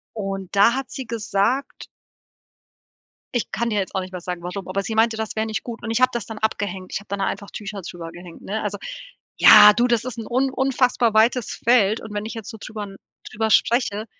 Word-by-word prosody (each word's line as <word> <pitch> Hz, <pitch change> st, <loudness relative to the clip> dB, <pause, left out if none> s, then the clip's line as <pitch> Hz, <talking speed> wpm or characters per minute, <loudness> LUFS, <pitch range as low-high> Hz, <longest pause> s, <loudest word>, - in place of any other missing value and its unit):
Und 195 Hz, -3 st, -5 dB
da 205 Hz, +5 st, +6 dB
hat 270 Hz, -1 st, -4 dB
sie 265 Hz, -, -6 dB
gesagt 230 Hz, +3 st, -1 dB, 1.5 s
Ich 240 Hz, -, -1 dB
kann 235 Hz, +4 st, -1 dB
dir 210 Hz, -, 0 dB
jetzt 195 Hz, -, -3 dB
auch 190 Hz, -, 0 dB
nicht 185 Hz, 0 st, -9 dB
mehr 180 Hz, -, -6 dB
sagen, 180 Hz, -1 st, -5 dB
warum, 180 Hz, +2 st, -6 dB
aber 195 Hz, +1 st, -1 dB
sie 220 Hz, -, -4 dB
meinte, 225 Hz, +1 st, +3 dB
das 220 Hz, -1 st, -4 dB
wäre 220 Hz, +1 st, 0 dB
nicht 220 Hz, -, -3 dB
gut 235 Hz, -2 st, -8 dB
und 225 Hz, -, -4 dB
ich 225 Hz, +2 st, 0 dB
habe 255 Hz, -, +5 dB
das 235 Hz, -4 st, -4 dB
dann 220 Hz, -1 st, -7 dB
abgehängt. 200 Hz, -4 st, -3 dB
Ich -, -, -2 dB
habe 200 Hz, -, -18 dB
dann 200 Hz, 0 st, -4 dB
da -, -, +1 dB
einfach 200 Hz, -, -4 dB
Tücher 205 Hz, -1 st, -6 dB
drüber 170 Hz, -2 st, -8 dB
gehängt, 175 Hz, -1 st, -12 dB
ne? 215 Hz, +2 st, -3 dB
Also, 205 Hz, -1 st, -3 dB, 0.6 s
ja, 210 Hz, 0 st, +10 dB
du, 240 Hz, +1 st, +2 dB
das 235 Hz, -2 st, +1 dB
ist 250 Hz, -1 st, -6 dB
'n 225 Hz, -, -5 dB
un 260 Hz, +2 st, +1 dB
unfassbar 250 Hz, -3 st, +1 dB
weites 230 Hz, +2 st, +2 dB
Feld 225 Hz, -3 st, +4 dB
und 220 Hz, -, -9 dB
wenn 205 Hz, +1 st, -3 dB
ich 225 Hz, -, -6 dB
jetzt 225 Hz, -3 st, -7 dB
so 220 Hz, -, -10 dB
drüber 215 Hz, -1 st, -6 dB, 0.4 s
drüber 220 Hz, 0 st, -1 dB
spreche 220 Hz, -2 st, +2 dB
215 Hz, 230 wpm, -22 LUFS, 195-235 Hz, 1.5 s, ja